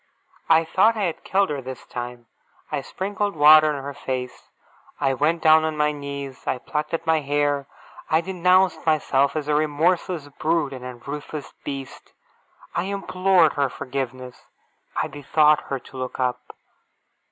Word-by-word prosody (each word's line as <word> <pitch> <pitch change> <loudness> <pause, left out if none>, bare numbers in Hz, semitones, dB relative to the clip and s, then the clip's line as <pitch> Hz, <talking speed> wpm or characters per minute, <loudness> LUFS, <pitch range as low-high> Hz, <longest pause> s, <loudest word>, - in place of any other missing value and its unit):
I 160 - +6
thought 220 +7 +3
I 210 - -1
had 170 -4 -2
killed 195 -3 +1
her, 140 -2 -3
this 130 0 -8
time. 120 -1 -7 0.5
I 145 -2 -1
sprinkled 200 +6 -3
water 155 +1 +7
on 140 -2 -4
her 140 +1 -5
face. 130 -2 -5 0.5
I 135 - +2
went 155 +5 0
down 155 0 +6
on 160 -1 -2
my 150 0 +2
knees. 140 -2 -7
I 130 - 0
plucked 150 +5 -3
at 165 - -6
my 160 -1 +3
hair. 145 -1 0 0.4
I 160 +1 +3
denounced 185 +1 +2
myself 140 -3 +2
as 150 -2 -2
a 150 - +1
remorseless 155 +2 +1
brute 155 -3 +1
and 130 -1 -8
a 125 -1 -7
ruthless 145 +3 -7
beast. 135 -2 -7 0.6
I 175 - -1
implored 190 -4 +2
her 140 -2 +1
forgiveness. 130 -2 -6 0.5
I - - 0
besought 150 +1 +3
her 135 - -1
to 130 +1 -13
look 130 0 -5
up. 125 -1 -2
150 Hz, 160 wpm, -23 LUFS, 135-165 Hz, 0.6 s, water